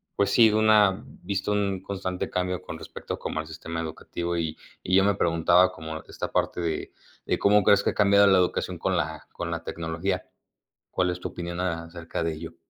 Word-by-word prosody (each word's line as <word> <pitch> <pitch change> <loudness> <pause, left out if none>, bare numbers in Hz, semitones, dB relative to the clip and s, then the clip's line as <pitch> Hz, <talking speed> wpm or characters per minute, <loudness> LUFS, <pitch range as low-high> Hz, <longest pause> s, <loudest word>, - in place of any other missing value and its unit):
pues 100 - +1
sí, 115 -2 +7
de 105 - 0
una 105 -3 +4 0.2
visto 100 +2 -1
un 100 -2 0
constante 95 -2 -4
cambio 90 0 -1
con 85 -3 -7
respecto - - -7
como - - -4
al 80 - -4
sistema 80 +1 -6
educativo. 85 +2 -4
Y 80 -1 -2 0.3
y 90 - +1
yo 95 - +5
me 100 - +3
preguntaba 85 +1 +4
cómo 80 -2 -7
esta - - -5
parte - - 0
de 80 -2 -3 0.3
de - - 0
¿cómo 105 0 +4
crees 100 - +5
que - - +2
ha - - -10
cambiado 100 -1 +5
la 95 -1 +6
educación 90 - 0
con - - 0
la - - -3
con 85 - -5
la 85 -1 -3
tecnología? 85 +4 -3 0.7
¿Cuál 90 -1 +1
es 90 - -4
tu - - -4
opinión 85 0 -5
acerca 85 -1 -4
de 80 0 0
ello? 80 +1 -8
90 Hz, 205 wpm, -26 LUFS, 85-100 Hz, 0.7 s, sí